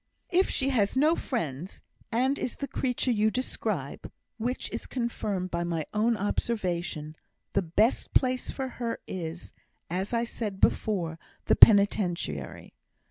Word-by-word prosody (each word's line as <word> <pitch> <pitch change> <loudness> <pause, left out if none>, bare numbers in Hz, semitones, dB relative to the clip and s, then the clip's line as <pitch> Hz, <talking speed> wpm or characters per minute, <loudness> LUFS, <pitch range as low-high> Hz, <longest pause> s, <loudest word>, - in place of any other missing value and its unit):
"If 370 +2 +3
she 270 -1 +1
has 225 -3 +1
no 310 +5 +5
friends, 175 - -4 0.3
and 260 +5 +1
is 245 - -2
the 280 - -4
creature 250 -1 0
you 215 -1 +3
describe 255 +4 -3 0.3
(which 245 +3 -2
is - - -5
confirmed 210 -7 -2
by 170 0 -1
my 165 -3 -2
own 220 +2 +2
observation), 175 -7 -2 0.4
the 195 - +3
best 205 +7 +1
place 255 -1 +2
for 265 -1 -3
her 235 -2 -4
is, 170 -1 -6 0.4
as 185 +3 -2
I 235 -1 +1
said 215 -4 -4
before, 170 -8 +1 0.3
the - - +4
Penitentiary. 175 - +4
210 Hz, 135 wpm, -28 LUFS, 175-245 Hz, 0.4 s, no